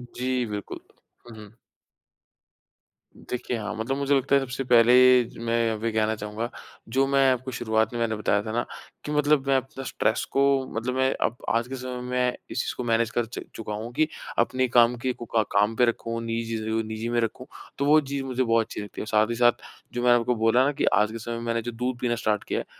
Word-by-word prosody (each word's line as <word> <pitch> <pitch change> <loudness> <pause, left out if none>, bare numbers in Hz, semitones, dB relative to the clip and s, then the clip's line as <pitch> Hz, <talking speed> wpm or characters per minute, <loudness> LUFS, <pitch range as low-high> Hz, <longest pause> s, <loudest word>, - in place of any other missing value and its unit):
जी 125 0 -1
बिल्कुल। 105 -3 -6 0.5
उहुँ। 110 -1 -12 1.7
देखिए 125 0 -3
हाँ, 105 -2 -4
मतलब 115 +5 -2
मुझे 140 0 +2
लगता 135 +1 +2
है 140 - +4
सबसे 135 0 -4
पहले 125 +1 +6
ज 115 - -13
मैं 115 -1 +1
वे 115 +1 -1
कहना 110 0 +1
चाहूँगा 105 +2 -5 0.5
जो 135 +1 +4
मैं 135 -1 +4
आपको 130 +1 -2
शुरुआत 110 -2 0
में 120 - -3
मैंने 115 -1 0
बताया 105 -1 +1
था 110 - -5
ना 120 +2 -1 0.4
कि 150 - -4
मतलब 150 -2 +2
मैं 135 - +3
अपना 130 +1 -5
स्ट्रेस 110 -3 0
को 135 - +2 0.3
मतलब 120 +3 -2
मैं 130 0 +2
अब 115 - -1
आज 115 +1 +1
के 135 - -5
समय 125 -1 -6
में 125 0 0
इस 130 - -2
चीज़ - - -3
को - - -3
मैनेज 115 -1 +1
कर 120 0 0
च 115 - -7
चुका 105 -1 -5
हूँ 110 +3 -5
कि 155 +5 +2 0.3
अपनी 130 +2 +2
काम 120 0 +4
कि 125 +1 -2
कूका 115 -2 -1
काम 105 +2 +2
पे 125 - +4
रखूँ 115 0 -2
निजी 115 0 -2
चीज़ों 110 0 -3
को 115 - +1
निजी 110 +1 -4
में 120 - +1
रखूँ 115 +3 -4 0.3
तो 140 - 0
वो 150 +2 +6
चीज़ 140 -1 -4
मुझे 130 -1 -1
बहुत 115 -1 +2
अच्छी - - -7
लगती 105 - -7
है। - - -3
और - - -9
साथ 110 0 +2
ही 120 - -1
साथ 120 0 +3 0.3
जो 120 - -2
मैंने 120 -1 +6
आपको 125 +1 0
बोला 115 +3 +3
ना 145 - +2
कि - - +4
आज 105 0 +3
के 115 - -6
समय 115 +1 -5
में 115 - -5
मैंने 115 0 0
जो 120 +2 -5
दूध 125 +2 -3
पीना 120 -1 +1
स्टार्ट 105 -2 -1
किया - - -2
है - - -5
120 Hz, 235 wpm, -25 LUFS, 110-130 Hz, 1.7 s, पहले